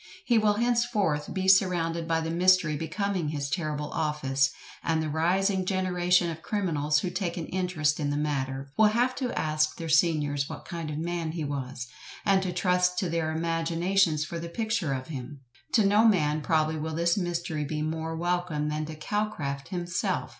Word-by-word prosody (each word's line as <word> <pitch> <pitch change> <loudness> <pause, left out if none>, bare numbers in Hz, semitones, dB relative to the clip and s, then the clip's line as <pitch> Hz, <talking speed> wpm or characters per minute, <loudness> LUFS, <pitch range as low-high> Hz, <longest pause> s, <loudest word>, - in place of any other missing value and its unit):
He 235 -3 +4
will 210 -1 +3
henceforth 225 -10 +1
be 190 -1 -2
surrounded 170 -3 +3
by 165 -1 +1
the 160 0 -3
mystery 180 -2 +4
becoming 175 +2 -2
his 140 -2 -3
terrible 150 -4 -2
office, 140 -4 +1 0.3
and 160 -1 0
the 155 -1 -2
rising 185 +5 +1
generation 180 -2 +2
of 165 0 -8
criminals 155 -8 0
who 180 - -2
take 180 -2 -2
an 165 - -3
interest 170 -5 0
in 145 -2 0
the 145 - -1
matter, 135 -2 -2
will 220 - +6
have 240 +4 +2
to 255 -3 -1
ask 155 0 +1
their 165 -1 -5
seniors 150 -3 +2
what - - -8
kind 170 -3 -5
of 150 - -4
man 165 0 -2
he 165 -2 -3
was, 135 -3 -4 0.4
and 195 -1 +4
to 185 -1 -2
trust 180 0 +1
to 180 -1 0
their 165 -1 0
imaginations 165 0 +1
for 170 +1 -5
the 170 0 -6
picture 220 -4 -1
of 130 +1 -5
him. 135 -1 -7 0.3
To 220 - +4
no 205 +2 +5
man 155 -7 +2
probably 155 0 +1
will 160 +1 -3
this 170 +1 +2
mystery 170 -4 -2
be 150 +1 -3
more 160 +1 -3
welcome 170 -3 -1
than 155 0 -2
to 155 - -7
Calcraft 150 -6 -3
himself. 175 -1 -2
165 Hz, 180 wpm, -28 LUFS, 150-185 Hz, 0.4 s, will